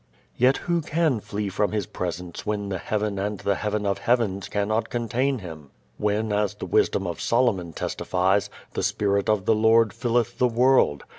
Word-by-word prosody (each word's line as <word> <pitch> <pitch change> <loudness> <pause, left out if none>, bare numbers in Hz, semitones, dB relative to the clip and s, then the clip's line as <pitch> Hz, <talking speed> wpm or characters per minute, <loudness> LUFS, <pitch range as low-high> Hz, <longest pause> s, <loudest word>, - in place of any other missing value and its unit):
Yet 130 +2 +4
who 170 -1 +1
can 155 -5 +1
flee 105 0 -4
from 105 +2 0
His 105 -3 -1
Presence 90 -1 -5
when 105 -1 -2
the 95 -2 -3
heaven 105 -1 -2
and 105 0 -2
the 100 - +1
heaven 105 +1 -2
of 100 -1 0
heavens 110 -6 0
cannot 105 +2 -1
contain 125 +3 0
Him? 80 - -9 0.3
when 105 +1 0
as 105 -1 0
the - - -6
wisdom 100 - +1
of 85 -1 -4
Solomon 115 -8 +1
testifies, 95 +5 0 0.2
"the - - -2
Spirit 100 +1 0
of 105 -3 +1
the - - +4
Lord 110 -1 +4
filleth 120 -1 -1
the 125 - +4
world?" 120 - +3
105 Hz, 175 wpm, -25 LUFS, 100-115 Hz, 0.3 s, Yet